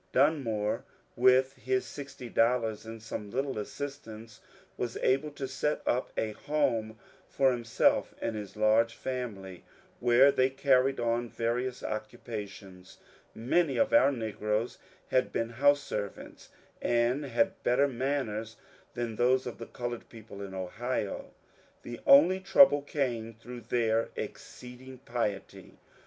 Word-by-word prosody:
Dunmore 125 -7 +1 0.3
with 130 +2 +4
his 390 -1 -1
sixty 135 -3 -8
dollars 115 -2 +1
and 115 0 -7
some 105 -2 -6
little 135 +1 -2
assistance 115 -2 -7 0.3
was 120 -1 -3
able 135 +4 +1
to 135 -2 -4
set 135 +3 -1
up 125 - 0
a 110 - 0
home 115 -5 -1 0.3
for 135 -1 +3
him 120 -1 -4
self 110 - +2
and 115 - -2
his 105 -1 -7
large 110 +2 +3
family, 105 -8 -5 0.4
where 125 +4 +6
they 130 -1 +2
carried 135 0 +2
on 120 0 0
various 120 +3 -2
occu 110 0 -4
pations. 100 -4 -9 0.4
Many 140 +7 +1
of 275 -1 +2
our 290 - +6
negroes 110 -2 -2 0.3
had 130 - +1
been 115 0 -1
house 145 +4 +3
servants, 100 -6 -6 0.3
and 120 +4 +1
had 190 +9 0
better 135 +4 +3
manners 120 -4 -2 0.4
than 120 -2 -3
most 125 +3 +2
of - - -6
the - - -7
coloured 120 -1 -6
people 110 -3 -11
in 95 -1 -7
Ohio. 100 +4 -3 0.5
The 120 -1 -7
only 165 +7 +7
trouble 185 -5 +6
came 120 -6 -2
through 120 +2 -10
their 115 -1 +1
exceeding 125 +1 -8
piety. 115 -6 -4
120 Hz, 135 wpm, -30 LUFS, 110-135 Hz, 0.5 s, only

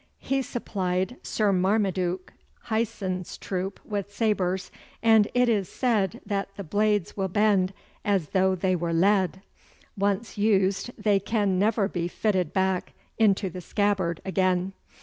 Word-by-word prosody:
'He 270 0 -1
supplied 190 -3 -2
Sir 210 -2 +1
Marmaduke 185 -1 0 0.3
Hyson's 210 -5 -2
troop 190 +1 -4
with 205 -1 -4
sabres, 190 -4 0 0.3
and 220 -2 +6
it 245 0 +4
is 205 -5 +1
said 215 -8 0
that 200 -1 -2
the 200 - -5
blades 205 +2 0
will 195 -1 -1
bend 195 -1 +2 0.3
as 195 -7 +1
though 190 -1 +2
they 185 0 +1
were 170 -1 -2
lead. 190 +1 +2 0.5
Once 205 +2 -1
used 195 0 +2
they 210 -2 +2
can 200 -2 0
never 210 0 +2
be 175 -3 -2
fitted 185 -3 0
back 190 -1 0 0.3
into 200 -3 +3
the 180 0 -6
scabbard 190 -3 0
again. 185 0 +1
195 Hz, 135 wpm, -26 LUFS, 185-210 Hz, 0.5 s, and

